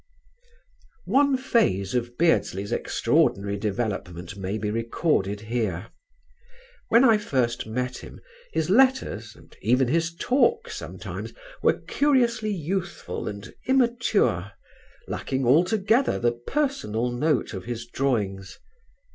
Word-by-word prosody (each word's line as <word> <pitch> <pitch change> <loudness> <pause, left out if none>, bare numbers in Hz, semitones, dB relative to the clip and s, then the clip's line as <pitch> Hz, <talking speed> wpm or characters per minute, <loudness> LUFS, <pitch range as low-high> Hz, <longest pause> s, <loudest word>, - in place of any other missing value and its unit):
One 280 -1 +3
phase 215 - +1
of 120 -1 -2
Beardsley's 100 - +1
extraordinary 100 +1 +1
development 100 -4 -3
may 100 +1 -3
be 105 -1 -2
recorded 115 - 0
here. 110 -5 -3 1.0
When 235 +3 +6
I 225 -4 +5
first 125 - -1
met 125 +3 -3
him - - -11 0.3
his 160 - 0
letters, 255 - +2
and - - -18
even 125 +3 +2
his 165 +3 0
talk 285 - +1
sometimes, - - -7 0.3
were - - +2
curiously 245 -6 +1
youthful 175 - -3
and 100 -1 -7
immature, 235 - +2 0.5
lacking 130 -1 -2
altogether 195 - +3
the 120 0 +2
personal 125 - -2
note 140 +2 0
of 95 -2 -6
his 120 -1 -5
drawings. 100 -8 -2
125 Hz, 110 wpm, -25 LUFS, -, 1.0 s, When